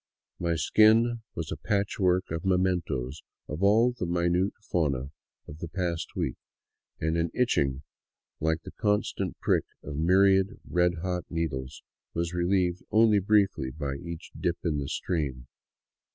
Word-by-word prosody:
My 85 -1 0
skin 110 +7 +4
was 80 -1 -4
a - - -3
patchwork 95 -3 0
of 80 0 -3
mementoes 90 -8 0 0.3
of 75 +4 -5
all 110 +5 +5
the 120 -8 -4
minute 85 +2 +1
fauna 70 -9 -1 0.4
of 75 - -10
the 85 - -5
past 85 -1 -3
week, - - -2 0.6
and 80 +1 0
an 85 0 +1
itching 70 - +1 0.6
like 80 +1 0
the - - -9
constant 105 -1 -1
prick - - +2 0.2
of 70 - -6
myriad 95 +5 +4
red 90 0 +2
hot 90 -2 -2
needles 70 -5 -3 0.3
was 85 +1 -1
relieved 90 0 +1
only 110 -1 +5
briefly 100 -8 +2
by 70 0 -4
each 85 +2 -7
dip 85 -1 -1
in 75 -4 0
the 70 - -4
stream. 70 -8 -2
85 Hz, 140 wpm, -28 LUFS, 80-95 Hz, 0.6 s, all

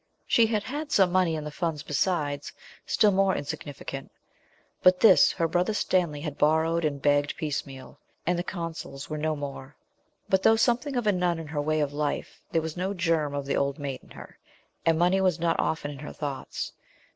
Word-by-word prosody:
She 230 -1 +4
had 215 -2 0
had 295 +5 -5
some 190 -3 +4
money 180 -3 +2
in 155 - -4
the 150 - -6
Funds 160 -2 -2
besides, 145 -2 -1 0.4
still 210 - +4
more 195 0 +3
insignificant 140 -1 -6 0.7
but 185 0 +5
this 205 -5 +7
her 165 -2 0
Brother 180 +5 0
Stanley 170 -8 +1
had 150 -2 -5
borrowed 160 +2 +2
and 145 -2 -1
begged 145 0 +2
piecemeal, 140 -3 -5 0.3
and 175 0 +1
the - - -1
Consols 165 -5 -6
were 155 - -2
no 155 0 0
more. 140 -1 -7 0.5
But 190 0 +2
though 220 - +6
something 245 +5 +1
of 245 -2 0
a 210 - +5
nun 180 -2 +1
in 165 - -6
her 145 0 -3
way 155 +1 +1
of 145 -1 -1
life, 150 0 -3
there 165 - +1
was 160 -1 -4
no 190 +3 -2
germ 165 -5 0
of 140 -1 -3
the 140 - -1
old 140 0 0
maid 140 -3 -5
in - - -20
her, - - -12 0.5
and 165 -1 +4
money 180 +3 +3
was 180 -3 +2
not 165 0 +1
often 160 -2 -1
in 140 - -9
her 150 - -7
thoughts. 140 -3 -5
160 Hz, 200 wpm, -27 LUFS, 145-185 Hz, 0.7 s, this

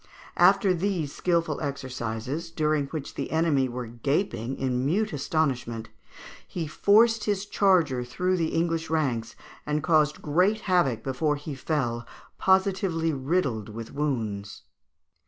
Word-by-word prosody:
After 195 -4 +5
these 175 -5 -1
skilful 170 -4 0
exercises, 135 +1 -4
during 155 -3 0
which 145 -1 -6
the 140 - -4
enemy 155 -5 +2
were 125 0 -5
gaping 120 - -2
in 125 -1 -1
mute 205 +10 0
astonishment, 125 - -1 0.6
he 170 -3 -4
forced 215 +8 +4
his 205 -1 0
charger 175 -12 +2
through 180 +10 -1
the 165 -2 +1
English 165 -1 0
ranks, 130 -8 -1 0.3
and 150 0 -1
caused 155 -2 +2
great 185 +8 +2
havoc 160 - +1
before 145 +3 0
he 145 +1 -6
fell, 125 -4 -2 0.3
positively 190 -4 +2
riddled 135 - -1
with 115 +1 -8
wounds. 110 -9 -3
150 Hz, 125 wpm, -26 LUFS, 125-175 Hz, 0.6 s, After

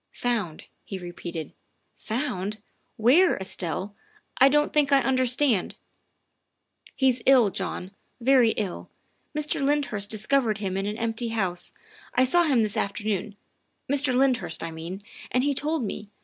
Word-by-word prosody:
"Found," 220 -10 -2 0.2
he 195 - -6
repeated, 175 -2 -7 0.4
"found? 215 -4 -3 0.4
Where, 280 +12 +5
Estelle? 190 +1 -3 0.5
I 270 - +8
don 295 +1 +3
't - - -15
think 290 -2 +2
I 275 - +6
understand. 255 -4 +2 0.4
' - - -50
' - - -52
" - - -26
He's 260 -3 +2
ill, 250 -7 +6
John 185 +1 -4 0.3
very 250 -2 +4
ill. 200 -4 -4 0.5
Mr. 300 -1 0
Lyndhurst 275 -8 0
discovered 220 +1 +1
him 195 -3 -3
in 195 +1 -2
an 210 +1 -3
empty 230 +1 -1
house. 190 -6 -1 0.4
I 255 - +5
saw 345 +7 +4
him 260 -7 +3
this 215 +1 -2
afternoon, 205 -1 -2 0.5
Mr. 280 -2 +2
Lyndhurst, 255 -11 +1
I 165 - -4
mean, 170 +5 -7 0.3
and 255 - +1
he 285 0 +1
told 300 +1 -1
me. 205 -1 -5
230 Hz, 150 wpm, -26 LUFS, 200-270 Hz, 0.5 s, I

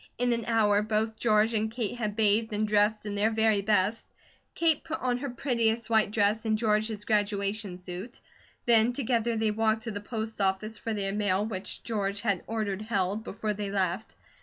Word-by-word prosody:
In 245 0 +2
an 230 -1 -2
hour, 210 -3 +3
both 220 +1 -1
George 215 0 +3
and 220 0 0
Kate 230 -1 -3
had 215 -4 -3
bathed 220 +1 +2
and 215 +1 0
dressed 210 +1 +2
in 205 - -3
their 205 +2 +2
very 220 -2 +2
best. 210 +1 +1 0.5
Kate 325 -3 +2
put 320 0 -4
on 250 -1 0
her 280 - -4
prettiest 235 -3 0
white 220 -2 +4
dress 210 +1 +1
and 220 -1 +1
George 215 -1 +2
his 210 -2 -5
graduation 205 -2 0
suit. 185 +6 -8 0.5
Then 235 0 +4
together 235 -3 0
they 220 -1 +1
walked 220 +1 +1
to 225 - -4
the 205 -1 -5
post 220 0 -4
office 200 +3 -1
for 225 -1 -3
their 195 -1 -2
mail, 205 -1 +1
which 200 -3 -5
George 205 -3 -2
had 200 -5 0
ordered 210 -3 -2
held, 205 -1 -1
before 215 +1 -3
they 205 0 -4
left. 195 +1 -1
215 Hz, 190 wpm, -28 LUFS, 205-225 Hz, 0.5 s, white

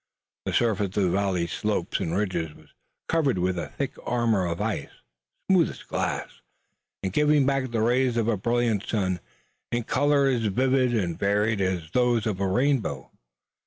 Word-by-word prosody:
The - - -2
surface 105 -5 +1
of 95 -4 +2
valley, 95 -3 +1
slopes - - -2
and 85 +3 -1
ridges 95 -6 -2
was - - -19 0.4
covered 145 - +1
with 90 0 0
a - - -4
thick - - -4
armor 115 -6 +1
of 85 -1 -3
ice, - - -2 0.6
smooth 185 -4 +4
as - - -10
glass, - - -3 0.6
and 95 -1 -2
giving 150 0 +4
back 135 -1 0
the 115 -2 0
rays 125 +1 +2
of 115 -1 +1
a 115 - +2
brilliant 115 0 0
sun 95 -5 0 0.5
in 120 0 0
colors 140 -1 +2
as - - +3
vivid 130 +3 +2
and 90 -6 -1
varied 105 +1 +1
as 90 -4 -1
those 120 -3 +2
of 105 -4 -1
a 100 - +1
rainbow. 120 - 0
110 Hz, 165 wpm, -26 LUFS, 95-125 Hz, 0.6 s, smooth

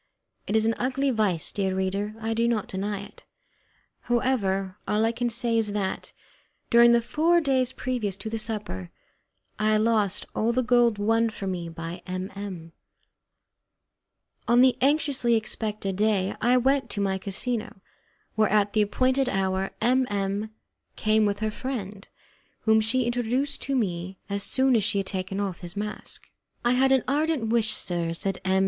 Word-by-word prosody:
It 210 - -1
is 220 0 +3
an 225 - +2
ugly 265 +2 0
vice, 205 -8 0
dear 190 -2 -1
reader, 195 +3 -2
I 225 0 -2
do 230 +1 +1
not 230 -2 0
deny 200 -2 -3
it. 200 - -13 0.8
However, 205 -6 0
all 215 +1 +2
I 225 - +2
can 240 +1 -1
say 235 -1 +1
is 210 -2 0
that, 195 -2 -3 0.6
during 235 0 +7
the 235 -1 +4
four 330 +7 +3
days 260 -5 +1
previous 245 -7 -2
to 210 - -7
the 225 +1 -2
supper, 205 - -4 0.7
I 215 0 +3
lost 215 -3 +1
all 230 +2 +1
the 255 +1 +1
gold 240 -2 +3
won 225 +2 +2
for 210 -2 -7
me 180 -3 -3
by 165 +2 -7
M 185 +1 -4
M 185 -5 -7 1.8
On 240 +1 +5
the 255 -1 +5
anxiously 275 -4 +2
expected 210 -3 -2
day 205 -2 +1
I 245 +2 +4
went 270 +2 +2
to 205 - -3
my 195 -1 0
casino, 215 +2 -2 0.5
where 215 -1 +2
at 205 0 +2
the 215 - +3
appointed 255 +5 +2
hour 190 0 0
M 255 +1 +3
M 200 +1 -2 0.5
came 215 0 +2
with 200 +1 -2
her 215 0 0
friend, 210 -5 -5 0.5
whom 220 0 +4
she 245 +3 +1
introduced 245 +3 -1
to 275 - -1
me 185 -5 -2
as 200 0 -1
soon 260 +4 +2
as 220 - +2
he - - 0
had 195 - 0
taken 190 +1 -3
off 195 -3 -3
his 175 +2 -8
mask. 210 +1 -6 0.3
"I 240 - +4
had 265 +2 +3
an 265 -2 +4
ardent 290 -4 0
wish, 225 -2 +1
sir," 170 -2 -1
said 195 +2 -3
M. 190 0 +2
215 Hz, 170 wpm, -26 LUFS, 195-240 Hz, 1.8 s, during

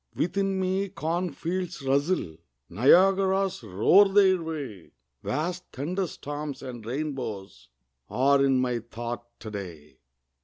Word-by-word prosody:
Within 195 +2 0
me 190 +1 0
cornfields 175 -1 -3
rustle, 135 - 0 0.3
Niagaras 190 - +4
roar 115 - +5
their 190 -2 +4
way, 145 - -6 0.3
Vast 175 +6 -2
thunderstorms 150 -3 -4
and 125 -4 -7
rainbows 125 -6 -5 0.4
Are 135 +5 +3
in 135 -1 +3
my 125 -2 0
thought 120 +1 -6
to 110 - -7
day. 80 -9 -8
145 Hz, 105 wpm, -27 LUFS, 120-185 Hz, 0.4 s, roar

